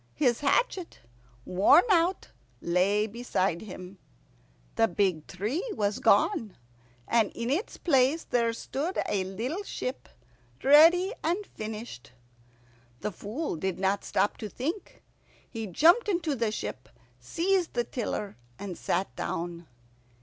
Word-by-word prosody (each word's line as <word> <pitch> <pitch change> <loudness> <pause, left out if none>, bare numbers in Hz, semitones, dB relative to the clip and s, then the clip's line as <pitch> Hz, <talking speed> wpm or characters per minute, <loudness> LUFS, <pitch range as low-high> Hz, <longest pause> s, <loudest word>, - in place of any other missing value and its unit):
His 250 -6 +2
hatchet, 360 - 0 0.5
worn 190 - +5
out, 350 +1 +2 0.3
lay 190 +5 +2
beside 200 -6 -1
him. 185 -2 -10 0.7
The 225 - +3
big 180 -4 0
tree 215 - -3
was 205 -2 -1
gone, 215 - +2 0.5
and 230 -3 +2
in 235 +2 -3
its 350 +10 -2
place 275 0 +2
there 235 -1 +1
stood 285 +9 -4
a 195 -2 0
little 230 - -4
ship, 265 -9 -5 0.5
ready 335 - +6
and 355 +6 0
finished. 215 - -8 0.9
The 210 - -2
Fool 220 - -4
did 190 +2 -2
not 195 +1 0
stop 205 - 0
to 215 - -6
think. 315 - -5 0.4
He 225 -2 -5
jumped 340 - +4
into 340 -6 0
the 230 -4 0
ship, 130 -10 -6 0.3
seized 345 - 0
the 240 - +2
tiller, 215 -4 -4 0.2
and 190 -4 -7
sat 195 - -1
down. 170 0 -4
230 Hz, 125 wpm, -28 LUFS, 195-320 Hz, 0.9 s, ready